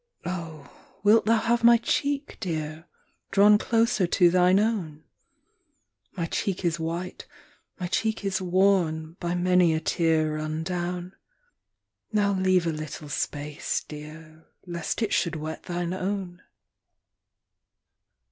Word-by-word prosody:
ii. 175 - -2
Oh, 160 -5 -7 0.4
wilt 215 +2 +5
thou 230 0 +5
have 235 +1 +1
my 235 0 +8
cheek, 280 +4 -1
Dear, 155 -2 -4 0.4
drawn 205 +1 +6
closer 230 -5 +2
to 175 0 +4
thine 180 +2 +4
own? 185 -9 -1 1.1
My 170 -3 -2
cheek 185 +2 -2
is 170 0 0
white, 170 +3 -4 0.5
my 180 - -3
cheek 220 +3 -1
is 190 -1 -1
worn, 175 -4 +2
by 175 0 -2
many 180 -2 +3
a - - 0
tear 160 -1 +1
run 155 +1 -3
down. 180 +1 -3 1.0
Now 205 -2 +2
leave 185 -2 +2
a 165 - +1
little 155 -1 -7
space, 145 +1 -3
Dear, 155 +1 -11 0.2
lest 175 +6 -3
it 215 - -1
should 170 -2 +1
wet 155 +1 -5
thine 175 0 -3
own. 185 -1 -4
175 Hz, 130 wpm, -26 LUFS, 160-195 Hz, 1.1 s, my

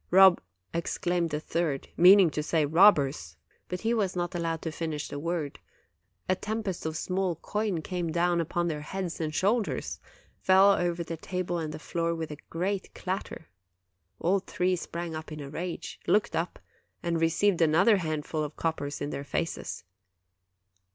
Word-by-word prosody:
" - - -39
'Rob 190 -1 +7 0.2
' - - -52
exclaimed 170 +1 0
the 150 -1 -2
third, 155 -3 -2
meaning 185 -1 +7
to 150 - -2
say 155 0 +1
'robbers'; 155 -3 +4 0.3
but 180 - -4
he 230 +1 +1
was 200 -5 0
not 175 -1 -2
allowed 165 -2 -1
to 160 - -2
finish 155 -2 -3
the 145 - -5
word: 165 -2 -3 0.7
a 185 - +3
tempest 205 -4 -3
of 160 0 -3
small 185 0 -1
coin 200 0 -2
came 175 -2 -2
down 175 +1 +2
upon 175 +1 -1
their 150 -3 -2
heads 175 +1 -4
and 155 -1 -2
shoulders, 210 +5 0 0.4
fell 190 +1 +6
over 175 -2 0
the 165 0 -5
table 180 +1 -3
and 155 -2 -3
the - - -6
floor 170 +1 -2
with 160 -2 -4
a 150 - -6
great 190 +3 -2
clatter. 185 -3 -5 0.7
All 190 +4 +2
three 185 -1 0
sprang 170 -1 -5
up 155 0 -6
in 155 - -6
a 140 -1 -7
rage, 170 +3 -5
looked 210 - +2
up, 165 +2 -2 0.5
and 170 -1 0
received 170 +3 +2
another 175 +7 +5
handful 155 -2 -2
of 150 0 -5
coppers 150 -3 -2
in 145 +1 -2
their 140 - -4
faces. 165 +3 -3
170 Hz, 170 wpm, -28 LUFS, 160-185 Hz, 0.7 s, Rob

